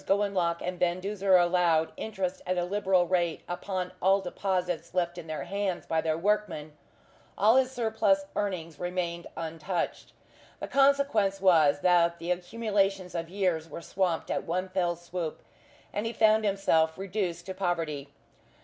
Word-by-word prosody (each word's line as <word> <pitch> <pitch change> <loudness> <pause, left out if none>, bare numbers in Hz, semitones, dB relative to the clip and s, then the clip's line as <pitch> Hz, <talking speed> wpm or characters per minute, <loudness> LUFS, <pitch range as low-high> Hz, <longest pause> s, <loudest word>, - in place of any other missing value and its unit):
Gowanlock 195 -4 +1
and 180 0 -4
Van 175 0 +1
Duzer 195 0 +2
allowed 175 -2 +3
interest 190 -4 -3
at 185 0 0
a 175 - +1
liberal 190 -1 +2
rate 175 -3 0
upon 180 +1 -3
all 195 +1 +4
deposits 180 -3 -2
left 175 -1 0
in 165 - -9
their 155 -3 -4
hands 195 +1 -2
by 160 -1 0
their 160 -1 0
workmen, 165 -6 -1 0.6
all 215 +4 +5
his 260 -1 +4
surplus 220 -5 +1
earnings 170 -7 -3
remained 175 -1 -3
untouched. 165 +2 -3 0.5
The - - -5
consequence 275 -8 +3
was 160 -7 +4
that 170 -1 +4
the 170 +1 -3
accumulations 195 0 -1
of 165 -1 -4
years 180 -4 -1
were 170 - -8
swamped 180 -3 -1
at - - -1
one 185 +3 -2
fell 180 -2 0
swoop, 170 -1 -5 0.5
and 205 - -1
he 230 - -3
found 220 -1 +4
himself 165 -5 +2
reduced 190 -3 -3
to 190 - -5
poverty. 165 -7 -2
180 Hz, 150 wpm, -28 LUFS, 170-195 Hz, 0.6 s, all